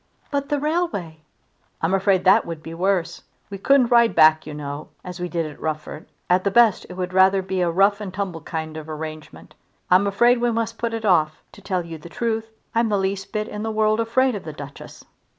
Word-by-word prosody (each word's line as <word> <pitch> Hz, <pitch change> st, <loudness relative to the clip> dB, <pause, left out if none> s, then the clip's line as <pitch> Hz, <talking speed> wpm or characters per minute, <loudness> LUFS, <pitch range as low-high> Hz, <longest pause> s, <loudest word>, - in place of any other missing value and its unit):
"But 280 Hz, -1 st, -2 dB
the 290 Hz, -, 0 dB
railway!" 295 Hz, -, -2 dB, 0.6 s
"I'm 165 Hz, +3 st, 0 dB
afraid 195 Hz, -1 st, +2 dB
that 185 Hz, -, +5 dB
would 165 Hz, -2 st, -7 dB
be 165 Hz, -, -8 dB
worse. 185 Hz, 0 st, -1 dB, 0.3 s
We 195 Hz, -, -6 dB
couldn't 255 Hz, +2 st, +3 dB
ride 235 Hz, -1 st, +5 dB
back, 155 Hz, 0 st, +5 dB
you 155 Hz, -, -6 dB
know, 145 Hz, 0 st, -6 dB
as 180 Hz, 0 st, -8 dB
we 180 Hz, 0 st, -3 dB
did 170 Hz, -2 st, -1 dB
at 150 Hz, -1 st, -10 dB
Rufford. 155 Hz, 0 st, -5 dB, 0.2 s
At 180 Hz, +1 st, +3 dB
the 200 Hz, -, +2 dB
best 230 Hz, 0 st, +4 dB
it -, -, -7 dB
would 180 Hz, 0 st, -3 dB
be -, -, -9 dB
rather 190 Hz, 0 st, +4 dB
a 185 Hz, -2 st, 0 dB
rough 200 Hz, +4 st, +3 dB
and 200 Hz, -3 st, -5 dB
tumble 185 Hz, -4 st, -4 dB
kind 160 Hz, 0 st, -5 dB
of 155 Hz, 0 st, -8 dB
arrangement. 155 Hz, 0 st, -8 dB, 0.4 s
I'm 185 Hz, +3 st, +5 dB
afraid 240 Hz, +5 st, +3 dB
we 240 Hz, -, +2 dB
must 230 Hz, 0 st, -2 dB
put 230 Hz, -1 st, -2 dB
it 225 Hz, -1 st, -5 dB
off. 155 Hz, -5 st, +2 dB
To -, -, -15 dB
tell 185 Hz, -3 st, -2 dB
you 165 Hz, -1 st, -8 dB
the 170 Hz, -, -11 dB
truth 225 Hz, +4 st, -2 dB, 0.2 s
I'm 230 Hz, 0 st, +2 dB
the 205 Hz, -, +1 dB
least 195 Hz, 0 st, -2 dB
bit 215 Hz, -1 st, -2 dB
in 210 Hz, -, -6 dB
the 220 Hz, -, -2 dB
world 215 Hz, 0 st, +1 dB
afraid 250 Hz, +3 st, +2 dB
of 205 Hz, -, -5 dB
the 155 Hz, -, -7 dB
Duchess." 145 Hz, -1 st, -11 dB
190 Hz, 220 wpm, -22 LUFS, 165-225 Hz, 0.6 s, that